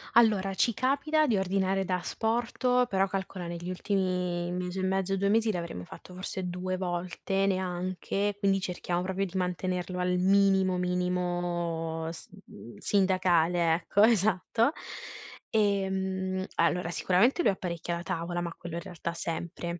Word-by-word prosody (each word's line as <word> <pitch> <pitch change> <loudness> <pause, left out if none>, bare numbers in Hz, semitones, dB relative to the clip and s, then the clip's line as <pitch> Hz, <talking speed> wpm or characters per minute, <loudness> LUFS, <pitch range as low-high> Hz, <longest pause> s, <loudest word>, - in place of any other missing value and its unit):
Allora, 205 -5 +4
ci 230 +3 +2
capita 285 +4 +2
di 225 -7 +2
ordinare 190 0 +1
da 185 - 0
asporto, 240 +5 +1
però 195 -3 +2
calcola 190 -2 -4
negli 170 +1 -6
ultimi 180 -2 -1
mese 180 +1 -3
e - - -2
mezzo 190 0 0
2 200 +1 +1
mesi 220 +1 +3
l'avremo 170 - -5
fatto 180 - -12
forse 185 0 -4
2 185 +1 -3
volte 185 +2 -1
neanche, 185 +2 -1
quindi 195 -1 +2
cerchiamo 175 -1 -2
proprio 190 +1 -1
di 190 0 -9
mantenerlo 180 0 -2
al 180 0 +1
minimo 190 -1 +4
minimo 175 -2 -1
s 165 - -10 0.2
mhmm, 120 - -12
sindacale 180 -4 +3
ecco 180 +4 +2
esatto. 220 - +3 0.8
Ehm, 190 -2 0
allora 170 +1 +1
sicuramente 215 - +3
lui - - +4
apparecchia 175 -2 -3
la 170 - -5
tavola, 170 +1 -2
ma 170 -1 -4
quello 170 -1 -7
in 170 - -3
realtà 170 0 -5
sempre. 170 +1 -4
185 Hz, 140 wpm, -29 LUFS, 175-195 Hz, 0.8 s, Allora